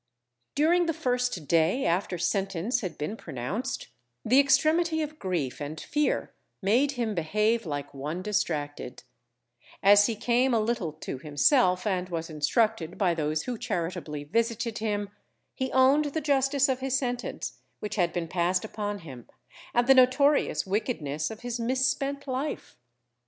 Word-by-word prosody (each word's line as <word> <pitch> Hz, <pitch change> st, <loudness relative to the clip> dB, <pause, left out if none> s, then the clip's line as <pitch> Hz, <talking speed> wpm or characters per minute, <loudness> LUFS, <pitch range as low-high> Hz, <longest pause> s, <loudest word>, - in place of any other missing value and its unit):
During 335 Hz, +4 st, +3 dB
the 330 Hz, -, 0 dB
first 250 Hz, -, -1 dB
day 170 Hz, -, +2 dB
after 180 Hz, +1 st, 0 dB
sentence 195 Hz, +6 st, -1 dB
had 185 Hz, -6 st, -5 dB
been 150 Hz, +9 st, -3 dB
pronounced, 205 Hz, -, -4 dB, 0.4 s
the 255 Hz, +5 st, +5 dB
extremity 315 Hz, +4 st, +3 dB
of 305 Hz, +1 st, -7 dB
grief 165 Hz, -9 st, -2 dB
and 150 Hz, +2 st, -5 dB
fear 295 Hz, 0 st, -1 dB, 0.3 s
made 245 Hz, +8 st, +2 dB
him 235 Hz, -4 st, -2 dB
behave 210 Hz, +5 st, 0 dB
like 145 Hz, -1 st, -4 dB
one 150 Hz, +6 st, -4 dB
distracted; 150 Hz, -10 st, -2 dB, 0.8 s
as 205 Hz, +1 st, +7 dB
he 230 Hz, -, -2 dB
came 240 Hz, +3 st, +2 dB
a -, -, +3 dB
little 215 Hz, -6 st, -1 dB
to 150 Hz, -3 st, -7 dB
himself, 180 Hz, -, +3 dB
and 185 Hz, -3 st, -1 dB
was 165 Hz, -1 st, -4 dB
instructed 175 Hz, +3 st, 0 dB
by 185 Hz, -4 st, +2 dB
those 155 Hz, -1 st, -1 dB
who 245 Hz, -3 st, -4 dB
charitably 165 Hz, -4 st, -3 dB
visited 230 Hz, +6 st, -1 dB
him, 205 Hz, -2 st, -2 dB, 0.4 s
he 260 Hz, 0 st, -3 dB
owned 270 Hz, +3 st, +4 dB
the 290 Hz, +2 st, -2 dB
justice 275 Hz, -1 st, +2 dB
of 260 Hz, -2 st, 0 dB
his 265 Hz, 0 st, 0 dB
sentence, 245 Hz, -2 st, -4 dB, 0.2 s
which 210 Hz, 0 st, -5 dB
had 175 Hz, -4 st, +1 dB
been 170 Hz, -2 st, -3 dB
passed 180 Hz, +3 st, 0 dB
upon 205 Hz, -2 st, -4 dB
him, 130 Hz, -7 st, -11 dB, 0.4 s
and 240 Hz, 0 st, +2 dB
the 270 Hz, -, +7 dB
notorious 270 Hz, +3 st, +4 dB
wickedness 165 Hz, -, -2 dB
of 220 Hz, -1 st, -9 dB
his 245 Hz, -1 st, -4 dB
misspent 275 Hz, +3 st, 0 dB
life. 265 Hz, +3 st, -4 dB
215 Hz, 150 wpm, -27 LUFS, 170-260 Hz, 0.8 s, as